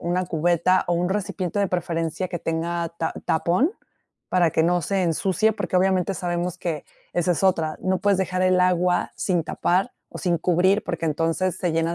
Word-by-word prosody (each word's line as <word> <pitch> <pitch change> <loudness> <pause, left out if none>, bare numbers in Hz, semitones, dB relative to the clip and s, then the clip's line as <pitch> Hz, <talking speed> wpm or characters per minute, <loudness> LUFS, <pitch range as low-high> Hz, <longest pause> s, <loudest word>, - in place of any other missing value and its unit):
una 180 +1 -1
cubeta 175 +2 +2
o 175 - +2
un 175 +1 0
recipiente 195 -1 -2
de 200 - +1
preferencia 170 0 -2
que 175 - -4
tenga 170 +1 -2
ta 160 - -1
tapón. 180 - +2 0.6
Para 175 -3 +3
que 160 - +2
no 175 0 +2
se 195 +2 0
ensucie, 190 +5 +1
porque 200 - -4
obviamente 185 0 +2
sabemos 175 -1 -3
que 160 -4 -3 0.3
esa 175 0 +1
es 170 - -3
otra. 165 -5 +1
No 185 0 +1
puedes 200 -1 +2
dejar 185 -1 0
el 185 0 +3
agua 180 0 +2
sin 180 -3 0
tapar 180 +7 0 0.2
o - - -8
sin 175 -2 +1
cubrir 185 +5 +2
porque 170 -2 -3
entonces 165 +4 0
se 175 -4 -1
llena 165 +1 0
180 Hz, 185 wpm, -23 LUFS, 165-185 Hz, 0.6 s, Para